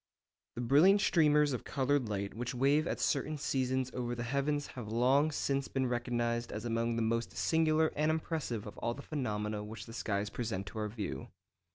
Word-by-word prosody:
_ - - -60
The 120 - -3
brilliant 150 - +6
streamers 150 -6 +4
of 125 - -3
coloured 135 -3 0
light 100 -1 -3
which 125 +3 -4
wave 140 +5 +3
at - - -2
certain 150 +2 0
seasons 130 -2 0
over 120 -1 -2
the 120 - -4
heavens 140 +4 0
have 120 -4 -7
long 130 +7 +3
since 140 -2 -1
been 135 -1 -1
recognised 120 -1 -1
as 105 +2 -5
among 115 0 0
the 115 - 0
most 115 +1 -1
singular 160 -1 +2
and 155 +1 +2
impressive 155 -8 -2
of 105 - -9
all 120 0 -1
the 140 - -9
phenomena 105 -7 -2
which 105 +1 -8
the 115 - -10
skies 105 -2 -2
present 100 -5 -3
to 110 - -6
our 105 - -1
view. 105 -1 -5
125 Hz, 195 wpm, -33 LUFS, 115-145 Hz, -, brilliant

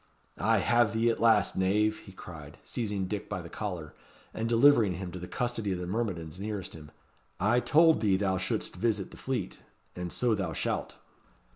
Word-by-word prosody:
"I - - +3
have 120 -3 +3
thee 115 +1 +3
at - - -4
last, 110 -3 +4
knave," 105 +3 +2
he 95 - -13
cried, 75 -6 -11
seizing 105 -5 -2
Dick 105 +2 -4
by 95 -4 -4
the 85 - -9
collar, 90 -8 -5 0.4
and 115 +1 -2
delivering 120 -4 +5
him 90 -1 -6
to 90 - -7
the 90 - -7
custody 120 -3 -2
of - - -3
the 90 - -4
myrmidons 90 -5 -3
nearest 105 -2 -4
him 75 -2 -11 0.5
"I 110 +6 +3
told 160 +5 +4
thee 100 -4 +3
thou 95 -2 0
should'st 95 - -2
visit 110 -4 -1
the - - -12
Fleet. 125 -8 -3 0.4
And 90 -1 -5
so 120 -2 +1
thou 95 -6 -2
shalt." - - -2
100 Hz, 185 wpm, -29 LUFS, 90-115 Hz, 0.5 s, delivering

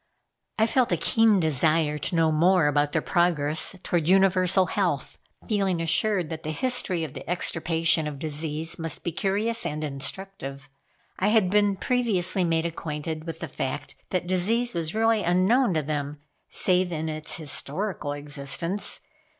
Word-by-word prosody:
I 220 - +4
felt 250 +2 +1
a - - +2
keen 225 -3 +3
desire 155 0 +1
to 170 - -2
know 165 -1 +3
more 175 +2 +4
about 145 0 +2
their - - 0
progress 165 -2 +1
toward 170 -3 0
universal 185 0 +4
health, - - -2 0.3
feeling 195 -5 0
assured 175 +1 +1
that 160 0 -5
the 155 - -5
history 195 -3 0
of 150 -4 -6
the - - -9
extirpation 165 -2 +1
of 150 -2 -5
disease 155 +2 -2
must 165 -1 -1
be 170 - -2
curious 210 +6 0
and 150 +1 -3
instructive. 140 0 -5 0.5
I 190 - +2
had 210 -4 +3
been 205 -1 +3
previously 200 -7 +1
made 165 -1 +1
acquainted 160 -1 -5
with 165 0 -6
the 165 - -3
fact 130 -2 -4 0.2
that 180 -1 -1
disease 215 +7 +1
was 165 +1 -3
really 225 -1 +3
unknown 185 +5 +2
to 155 - +1
them, 145 0 -3 0.3
save 180 -1 +1
in 160 -1 -3
its 155 -1 -5
historical 155 +1 -3
existence. 145 +6 -2
170 Hz, 155 wpm, -25 LUFS, 155-195 Hz, 0.5 s, I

